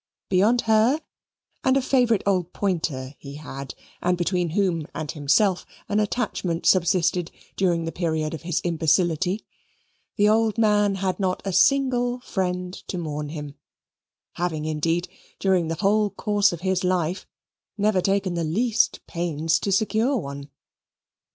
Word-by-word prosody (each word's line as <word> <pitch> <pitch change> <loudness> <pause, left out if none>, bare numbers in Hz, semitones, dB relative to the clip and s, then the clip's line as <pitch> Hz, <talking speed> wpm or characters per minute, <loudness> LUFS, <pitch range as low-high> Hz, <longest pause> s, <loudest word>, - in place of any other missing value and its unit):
Beyond 210 +6 +3
her 225 +6 +3 0.6
and 260 +1 +3
a - - +2
favourite 245 -5 +2
old 180 -3 0
pointer 155 -9 -2
he 140 0 -9
had, 140 -3 -8 0.3
and 180 0 +1
between 175 0 0
whom 170 -3 0
and 155 -1 -3
himself 165 +6 +2 0.2
an 210 0 +1
attachment 205 -6 -2
subsisted 180 -1 +3 0.3
during 170 -3 +1
the 165 - -3
period 160 -3 -1
of 160 - -6
his 170 -1 -1
imbecility, 175 +3 +1 0.7
the 205 -1 +3
old 220 +1 +2
man 210 -2 +3
had 190 0 -2
not 185 -2 -1
a 195 - -2
single 245 +3 +3
friend 180 -4 -2
to 185 - -4
mourn 150 -3 -4
him, 150 -2 -6 0.8
having 160 -3 -2
indeed, 165 +3 0 0.3
during 185 -4 +2
the 165 - -2
whole 205 +4 +2
course 205 +1 +1
of 170 -2 -6
his 190 0 0
life, 180 0 0 0.5
never 205 -2 +2
taken 195 -1 0
the 170 -1 -1
least 215 +9 +1
pains 165 -2 -1
to 200 - -2
secure 220 +7 +2
one. 140 -5 -6
180 Hz, 145 wpm, -24 LUFS, 165-205 Hz, 0.8 s, Beyond